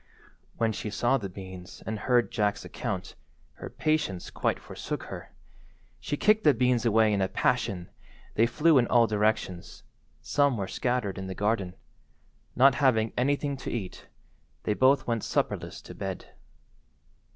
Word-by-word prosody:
When 115 -1 +1
she 105 - -4
saw 120 +6 +1
the 100 -4 -5
beans 95 -1 -10
and 110 -1 -3
heard 120 0 +2
Jack's 105 -3 0
account, - - -4 0.4
her - - -7
patience 155 - -1
quite - - 0
forsook - - -6
her. - - -9 0.7
She 145 - -3
kicked 215 +4 +3
the 150 -3 +5
beans 125 -1 +2
away 110 -1 +4
in 100 - +1
a 95 - +2
passion—they 95 +5 -1
flew 150 +4 +4
in 120 - +2
all 120 -1 +5
directions—some 110 - -1
were 100 -2 -2
scattered 120 -6 -1
in 95 - -5
the 95 - -5
garden. 100 -3 -1 0.8
Not 135 +1 +6
having 115 -5 +3
anything 140 +2 0
to 130 - -6
eat, 105 -6 -5 0.6
they 105 - +1
both 130 +5 +4
went 115 -3 -1
supperless - - -2
to - - -10
bed. - - -6
115 Hz, 145 wpm, -28 LUFS, 100-130 Hz, 0.8 s, Not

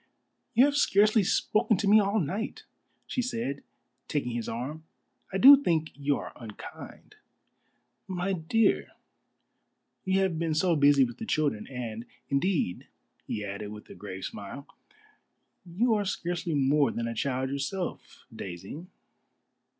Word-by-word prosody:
"You 245 +4 +7
have 285 0 +1
scarcely 215 -4 +4
spoken 215 +3 +2
to 200 - -1
me 210 +2 +7
all 205 +1 +2
night," 195 - -3 0.4
she 255 - -2
said, 230 - -3 0.5
taking 140 -5 -1
his 120 -1 -3
arm; 135 +7 -5 0.5
"I 190 - -1
do 275 +6 +9
think 160 - 0
you 140 0 0
are - - -7
unkind." 110 -4 -11 0.9
"My 190 +1 -2
dear, 195 +6 +1 1.1
you 190 0 +1
have 180 -4 0
been 165 -2 0
so 170 +2 +3
busy 145 -2 +5
with 120 -1 -4
the 225 - -6
children. 145 - 0
And, 120 -3 -6 0.2
indeed," 140 - 0 0.4
he 105 - -3
added, 100 +1 -5
with 105 0 -11
a - - -8
grave 95 -2 -7
smile, 120 +8 -7 1.0
"you 220 +8 +1
are 210 -1 +1
scarcely 175 -3 -2
more 140 +1 +3
than 115 0 -3
a 115 - -3
child 130 +2 -1
yourself, 145 +7 -4
Daisy." 95 - -7
155 Hz, 140 wpm, -28 LUFS, 125-195 Hz, 1.1 s, do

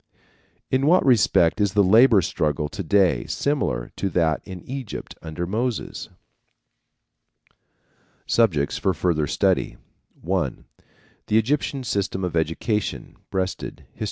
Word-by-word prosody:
'" - - -40
In 130 +2 +2
what 180 +3 +4
respect 110 -7 +3
is 100 -2 +1
the 105 -1 +4
labor 110 +1 +6
struggle 75 -1 -1
to 105 - -6
day 95 +1 +2
similar 140 - -1
to 100 - -1
that 80 -4 +1
in 95 -3 -9
Egypt 130 -4 -6
under 80 +2 -5
Moses? 115 +5 -3 2.2
Subjects 75 -12 +1
for 95 -2 0
Further 80 -3 0
Study. - - 0 0.4
(1) 85 -6 -2 0.6
The 105 - +3
Egyptian 135 +3 0
System 100 -4 -2
of 90 -2 -2
Education. 80 +7 -2
Breasted, 95 -1 -4
_Hist. - - -25
95 Hz, 125 wpm, -23 LUFS, 85-115 Hz, 2.2 s, labor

